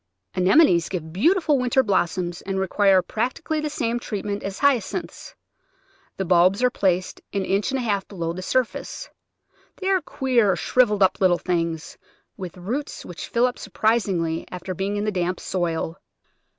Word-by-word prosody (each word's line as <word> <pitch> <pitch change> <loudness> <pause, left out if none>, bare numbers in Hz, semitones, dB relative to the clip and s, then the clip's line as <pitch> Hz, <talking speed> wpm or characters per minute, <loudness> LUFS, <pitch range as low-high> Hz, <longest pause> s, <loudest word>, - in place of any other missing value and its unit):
Anemones 185 - +4
give 160 -4 -5
beautiful 310 - +3
winter 250 +1 +2
blossoms 175 -3 0
and 190 0 -3
re 190 - 0
quire 195 -1 +4
practically 260 +7 -2
the 305 0 -2
same 235 -4 -1
treatment 205 -3 -4
as 195 0 -5
Hyacinths. 280 - -1 0.8
The 190 - -2
bulbs 185 +5 +4
are 250 - +4
placed 185 -3 0
an 195 -2 -1
inch 200 +4 0
and 270 - -1
a 255 - -2
half 200 -4 -1
below 170 -4 -4
the 185 - -6
surface. 255 - -2 0.7
They 380 -1 -2
are 380 -2 +3
queer, 240 - +1
shrivelled 210 +2 +2
up 190 - +2
little 180 -2 +4
things, 165 -3 -2 0.4
with 185 -3 -8
roots 240 +11 -4
which 175 - -7
fill 235 +1 +2
up 250 - -2
surprisingly 190 -8 0
after 180 +1 -5
being 195 +3 -2
in 205 - -1
the 215 - 0
damp 180 -1 -1
soil. 170 -1 -2
195 Hz, 165 wpm, -23 LUFS, 180-245 Hz, 0.8 s, Anemones